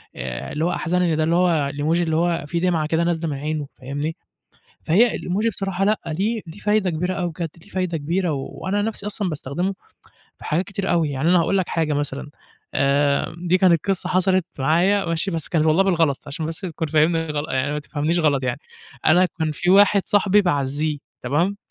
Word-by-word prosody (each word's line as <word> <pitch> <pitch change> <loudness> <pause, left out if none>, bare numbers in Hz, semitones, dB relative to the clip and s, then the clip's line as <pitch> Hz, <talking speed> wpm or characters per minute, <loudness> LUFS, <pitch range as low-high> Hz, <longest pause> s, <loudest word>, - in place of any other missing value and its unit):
آآ، 65 -1 -5
اللي 155 +2 -1
هو 175 - +1
أحزنني 175 -1 0
ده 155 - +1
اللي 165 +2 +2
هو 165 -6 +2
الemoji 155 +4 0
اللي 160 -2 0
هو 170 -2 +1
فيه 170 +3 -1
دمعة 170 -4 +1
كده 165 +2 +1
نازلة 170 -1 -1
من 140 - -3
عينه، 150 0 -3
فاهمني. 145 +5 -3 0.7
فهي 215 +9 +3
الemoji 205 +6 -1
بصراحة 195 -1 -2
لأ 210 +1 +2
ليه 200 +8 -1
ليه 165 +5 -10
فايدة 210 -3 +1
كبيرة 180 +3 -2
أوي 180 -2 -2
بجد 165 +1 -4
ليه - - -19
فايدة 185 -3 -1
كبيرة، 170 +3 -1
و 135 -2 -4
وأنا 205 +2 -2
نَفْسي 210 -1 -3
أصلًا 205 -2 -1
باستخدمه 170 +5 -3 0.6
في - - -14
حاجات 170 +5 0
كتير 195 0 -3
أوي 165 -4 +2
يعني. 140 +4 -1
أنا 180 -1 +5
هاقول 195 +4 +1
لك 185 - -1
حاجة 160 -2 0
مثلًا، 145 0 -3 0.4
آآ، 140 +2 +2
دي 180 +1 +1
كانت 180 -3 +3
قصة 185 -2 0
حصلت 185 0 +2
معايا، 175 +8 +2
ماشي، 165 +3 0
بس 165 -4 -3
كان 160 -2 +1
والله 160 +5 +4
بالغلط 165 -7 +1
عشان 150 +2 -4
بس 160 0 -6
تكون 165 -4 -4
فاهمني 160 +2 +2
غلط 150 0 -3
يعني 135 +2 0
ما 150 - -2
تفهمنيش 150 +3 -1
غلط 145 -4 +2
يعني، 130 +2 -2 0.5
أنا 180 +4 +5
كان 160 -1 0
في 175 +4 0
واحد 200 0 +6
صاحبي 205 0 +4
باعزيه 145 -2 0 0.2
تمام، 165 +11 0
165 Hz, 200 wpm, -22 LUFS, 150-185 Hz, 0.7 s, واحد